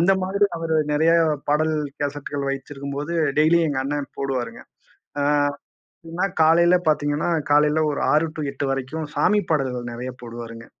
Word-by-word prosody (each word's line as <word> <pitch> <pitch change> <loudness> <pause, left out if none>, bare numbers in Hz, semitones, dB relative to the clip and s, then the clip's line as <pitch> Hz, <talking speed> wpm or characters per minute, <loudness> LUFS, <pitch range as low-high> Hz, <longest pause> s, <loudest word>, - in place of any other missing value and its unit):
அந்த 190 +3 +5
மாதிரி 200 +2 +2
அவரு 165 -1 0 0.2
நெறைய 160 +3 +3 0.4
பாடல் 155 +1 +2 0.3
கேசெட்டுகள் 145 -1 -3
வைச்சிருக்கும் 140 +1 -6
போது 160 +4 -3 0.3
டெய்லி 165 +2 +4
எங்க 140 -3 -1
அண்ணன் 145 0 -3
போடுவாருங்க. 125 -4 -3 0.6
ஆ - - +1 0.8
இதுன்னா 170 +3 -2 0.2
காலையில 170 +3 +5
பார்த்தீங்கன்னா, 145 +1 0 0.2
காலையில 150 +1 +4
ஒரு 145 - -3
6 155 +2 +4
டு 155 - -4
8 140 +1 -3
வரைக்கும் 135 +4 -3
சாமி 210 0 +3
பாடல்கள் 125 -5 -1
நெறைய 125 +2 -5
போடுவாருங்க. 115 -1 -8
145 Hz, 145 wpm, -23 LUFS, 135-160 Hz, 0.8 s, அந்த